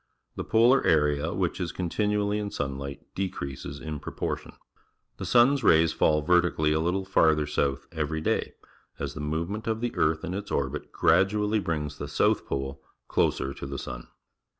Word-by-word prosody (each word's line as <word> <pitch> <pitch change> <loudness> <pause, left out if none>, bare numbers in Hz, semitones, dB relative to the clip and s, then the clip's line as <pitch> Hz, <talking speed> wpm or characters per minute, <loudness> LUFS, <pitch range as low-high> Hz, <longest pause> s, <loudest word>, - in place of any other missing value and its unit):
The - - -3
polar 120 +4 +4
area 75 0 +2
which 90 -1 -1
is 85 -3 -2
continuallj^ 105 +4 0
in 105 -1 -3
sunlight 70 -3 -4
decreases 70 -6 -4
in 75 -2 -5
proportion. - - -4 0.6
The - - -5
sun's 125 +2 +4
rays 80 -4 +5
fall 75 -1 +2
verti 90 0 +3
cally 75 0 +2
a 80 - +1
little 90 +4 0
farther 80 -5 +3
south 70 -2 -1
every 80 -1 -2
day, 80 - -1 0.4
as 70 0 -4
the 75 - -6
movement 85 +9 -3
of 110 0 0
the 120 0 -3
earth 80 +1 +1
in 90 - -3
its 100 +2 -5
orbit 70 +1 -2
gradu 105 +2 +3
ally 105 +1 +1
brings 75 -6 -3
the - - -4
south - - +1
pole 70 0 -3 0.3
closer 70 - +1
to 70 - -7
the 70 0 -5
sun. - - -7
80 Hz, 175 wpm, -27 LUFS, 75-100 Hz, 0.6 s, rays